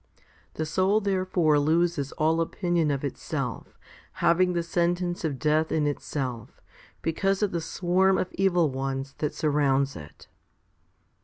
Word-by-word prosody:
The 155 - -2
soul 190 +6 +2
therefore 185 -6 +1
loses 160 -1 +1
all 160 +2 +1
opinion 170 -2 0
of 140 -1 -1
itself, 140 - -4 0.4
having 180 +1 +2
the 170 -1 0
sentence 175 +2 -1
of 150 -4 -1
death 155 +2 +1
in 155 -2 +1
itself* 135 -5 -4 0.4
because 195 +5 0
of 205 - +1
the 170 - -2
swarm 185 +3 +2
of 185 - -1
evil 175 -6 +2
ones 135 +1 -3
that 150 - -2
surrounds 140 -3 +1
it. 75 -2 -12
165 Hz, 135 wpm, -26 LUFS, 145-180 Hz, 0.4 s, soul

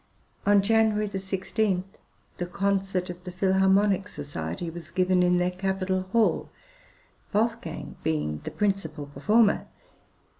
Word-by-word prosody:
On 205 -1 +5
January 220 0 +3
16, 195 0 -1 0.5
the 175 - -2
concert 195 -1 -1
of 175 0 -11
the 180 - -6
Philharmonic 190 +1 +3
Society 145 - -5
was 170 -1 -9
given 185 +1 +2
in 180 0 +4
their 180 0 +1
capital 185 0 -1
hall, 230 -1 +2 0.8
Wolfgang 225 +2 -2
being 75 -1 -1
the - - -4
principal 195 -8 -1
performer. 210 +9 +2
190 Hz, 115 wpm, -27 LUFS, 180-205 Hz, 0.8 s, On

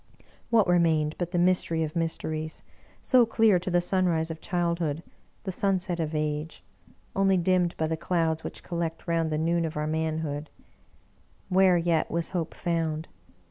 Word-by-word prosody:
What 225 -4 +4
remained 160 -4 +3
but 175 -1 -1
the 175 - -2
mystery 175 -2 +2
of 155 +1 -4
mysteries, 160 -1 -3 0.4
so 255 -2 +5
clear 220 -4 +4
to 185 - -4
the 175 0 +3
sunrise 175 -3 +1
of 160 - -8
childhood, 170 -3 -1 0.4
the 190 - -3
sunset 185 -2 0
of 160 -1 -2
age, 150 +1 -3 0.5
only 195 -1 +3
dimmed 180 0 +1
by 160 - 0
the 160 +1 -1
clouds 160 -1 0
which - - -7
collect 170 -1 -3
round 165 -1 +1
the 155 - 0
noon 170 +2 +1
of 160 -2 -3
our 150 - -1
manhood? 155 -1 -2 1.0
Where 185 -1 +5
yet 165 -2 +1
was 170 0 -2
Hope 170 -3 -3
found? 165 -2 -2
170 Hz, 160 wpm, -27 LUFS, 160-180 Hz, 1.0 s, so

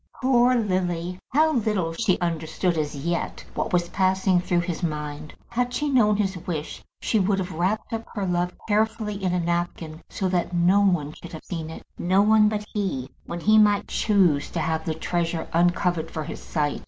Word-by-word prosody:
Poor 250 -1 +4
Lily! 180 -5 -1
How 310 +3 +3
little 210 - 0
she 185 +1 +1
understood 165 +1 -1
as 150 -2 -2
yet 170 +5 -3
what 225 - -2
was 175 -2 +2
passing 190 -1 +2
through 175 -1 +1
his 170 0 -4
mind. 150 -2 -4
Had 245 +1 -1
she 295 0 0
known 210 -6 +4
his 195 -2 0
wish 155 -4 -4 0.2
she 220 - +1
would 195 +1 +2
have 185 -1 -3
wrapped 185 +8 -1
up 225 0 -4
her 200 -2 -1
love 180 0 0 0.2
carefully 215 -1 0
in 185 - +1
a 180 - +1
napkin, 170 -2 -2
so 190 - -2
that 180 -1 -1
no 175 +4 +4
one 165 -7 +1
should 170 - -11
have 160 - -8
seen 165 -3 -5
it, 160 - -9 0.2
no 190 +3 +3
one 215 0 +5
but 210 -1 -3
he, 145 -11 -2 0.2
when 170 0 -5
he 215 +3 +5
might 205 -1 +4
choose 185 -9 +2
to 170 - -3
have 160 0 -1
the 160 - -1
treasure 165 0 -2
uncovered 175 -1 +2
for 155 - -4
his 155 - -7
sight. 145 -2 -1
180 Hz, 190 wpm, -24 LUFS, 165-210 Hz, 0.2 s, one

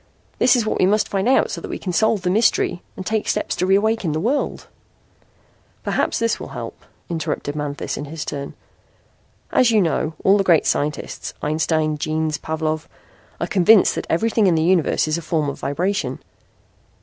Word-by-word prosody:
That 255 - +5
is 235 -3 +1
what - - -1
we 185 - +4
must 210 +2 +2
find 195 +2 -1
out 265 - +3
so - - -5
we - - -5
can 180 - -4
solve 220 -1 +2
the 180 - +1
mystery 215 -4 +2 0.2
and 185 - -6
take 220 +1 -1
steps - - -1
to 185 - 0
reawaken 200 -3 +2
the 155 - -1
world 255 - -1 0.6
" - - -37
"Perhaps - - 0
this 230 0 0
will - - -7
help," - - -8 0.2
interrupted 155 -3 -3
Manthis 145 -1 -4
in 145 - -5
his 155 +1 -6
turn. 140 -1 -5 1.0
"As 255 - +4
you 220 -2 +4
know, 165 -3 0
all 200 +2 +5
the - - +3
great 170 -4 +4
scientists 150 +1 -2
Einstein, 155 0 0
Jeans, 155 0 -1
Pavlov 155 0 -3 0.5
are - - 0
convinced 205 -1 +5
that - - -5
everything 220 +4 +2
in 175 - +3
the 160 - +2
universe 170 -3 +2
is 155 +2 0
a - - -8
form 155 -2 -1
of - - -7
vibration. 185 +9 -1
175 Hz, 185 wpm, -21 LUFS, 155-205 Hz, 1.0 s, That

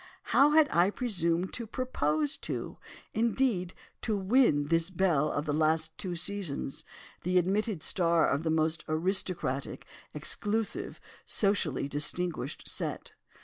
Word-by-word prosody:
How 280 +2 +7
had 305 0 +5
I 175 +3 +4
presumed 185 -6 -1
to 235 -2 -5
propose 285 +5 -1
to—indeed 225 -5 -2 0.3
to 215 -3 0
win 190 - +3
this 165 +1 +2
belle 170 -5 +1
of 145 - -2
the 150 - -1
last 160 +1 +1
two 180 -2 -2
seasons—the 180 0 -4
admitted 195 0 0
star 170 -4 +2
of 140 - +1
the 165 - -1
most 160 0 +1
aristocratic, 165 -4 -1 0.3
exclusive, 215 +1 -2 0.3
socially 190 -10 +1
distinguished 155 +4 -1
set? - - -3
180 Hz, 115 wpm, -30 LUFS, 160-210 Hz, 0.3 s, How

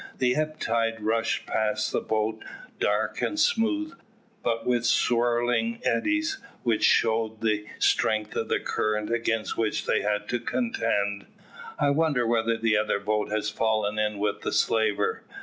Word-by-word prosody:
The 125 -1 +2
ebb 155 0 -2
tide 115 -1 0
rushed 110 +1 0
past 110 -1 0
the - - 0
boat 110 0 -1 0.4
dark - - 0
and 310 - -1
smooth, 310 +5 +1 0.5
but 115 -1 -1
with 120 -1 +1
swirling 120 - +1
eddies, 315 +5 0 0.2
which 115 -3 +1
showed 110 -1 +2
the 105 -1 0
strength 110 -1 +1
of - - -1
the - - +1
current 105 0 -1
against 115 -2 -1
which 110 -2 0
they - - +1
had 105 0 -1
to 120 0 0
contend. 115 - -1 0.5
"I 145 -1 +2
wonder 145 -5 +2
whether 115 0 +1
the 110 -1 +2
other 105 -1 0
boat 105 +1 -1
has 110 0 -1
fallen 110 -1 0
in 105 -1 0
with 105 0 -1
the - - -2
slaver." 115 - +1
115 Hz, 150 wpm, -26 LUFS, 110-125 Hz, 0.5 s, The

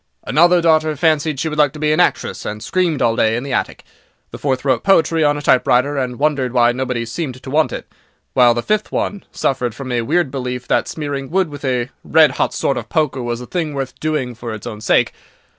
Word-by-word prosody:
"Another 175 +4 +4
daughter 155 -2 +3
fancied 155 -1 +1
she 160 - -1
would 150 -1 -3
like 145 -2 +4
to 155 - -9
be 150 0 +1
an - - 0
actress, - - 0
and 105 +1 -5
screamed 170 +2 0
all 115 -1 +2
day 110 0 +2
in 120 - -3
the 140 -1 -4
attic. - - -2 0.5
The - - -8
fourth 135 -2 -1
wrote 130 -4 +2
poetry 165 -4 +3
on 145 0 +2
a 145 - -6
typewriter, 130 +2 +3
and 125 -3 -2
wondered 140 -4 0
why 120 -1 +4
nobody 125 -1 -2
seemed 130 +2 -4
to 130 - -8
want 155 +2 +2
it; - - -6 0.5
while 120 -2 +5
the 120 - -2
fifth 215 0 -1
one 205 -1 -2
suffered 125 -4 -1
from 130 -1 -6
a 120 -1 +1
weird 155 +4 0
belief 125 -2 -4
that - - +2
smearing 140 -3 -4
wood 185 -1 +1
with 145 -1 -10
a 125 -1 -1
red 155 -1 +5
hot - - -1
sort 135 - -1
of - - -6
poker 150 -5 0
was 120 0 -3
a - - -7
thing 160 -1 -3
worth 135 -2 -3
doing 150 -5 -2
for 115 -1 -6
its 105 - -10
own 105 -1 -7
sake. - - +2
135 Hz, 230 wpm, -18 LUFS, 125-155 Hz, 0.5 s, while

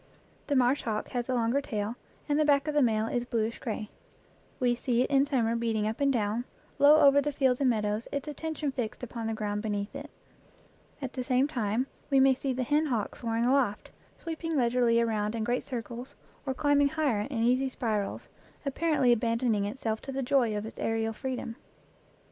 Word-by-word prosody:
The 285 - +1
marsh 255 +2 +3
hawk 215 -2 -3
has 245 -2 -3
the 260 - 0
longer 240 +4 +1
tail, 215 -4 -3 0.3
and 295 0 +1
the - - +5
back 285 -1 +3
of 300 - 0
the 295 - +3
male 220 -3 +2
is 240 +1 -1
bluish 230 -1 -2
gray. 220 -3 -4 0.7
We 245 -1 +3
see 245 0 +1
it - - -4
in 275 0 +4
summer 235 -5 +1
beating 225 -2 0
up 220 +5 -3
and 280 0 +4
down, 225 0 0 0.3
low 295 +2 +7
over 280 0 +6
the 295 +1 -1
fields 265 -2 +1
and 265 - +4
meadows, 215 -1 -1
its 280 +1 -3
attention 305 -1 -3
fixed 245 -2 -4
upon 230 -2 -4
the 225 - -2
ground 210 -1 -2
beneath 205 +2 -3
it. 285 +2 -7 0.9
At 265 - -4
the 255 - -3
same 255 +2 +2
time 235 -3 -1 0.2
we 275 -2 +4
may 265 0 +6
see 265 +1 -3
the 255 0 -1
hen 300 +5 +2
hawk 230 -7 -2
soaring 230 0 -1
aloft, 250 -5 +1 0.3
sweeping 325 -1 -3
leisurely 240 -2 +3
around 215 -2 0
in 225 - -2
great 245 +3 -1
circles, 245 0 -6 0.3
or 265 - -1
climbing 285 0 +3
higher 285 -9 0
in 230 -5 -1
easy 255 +3 +2
spirals, 215 -5 -2 0.4
ap 275 - -1
parently 300 -7 +3
abandoning 230 -2 +1
itself 220 0 -3
to 275 - -6
the 270 0 -2
joy 245 -5 +2
of 210 - -4
its 220 - -9
aerial 225 0 -1
freedom. 250 -1 -5
245 Hz, 200 wpm, -29 LUFS, 225-275 Hz, 0.9 s, low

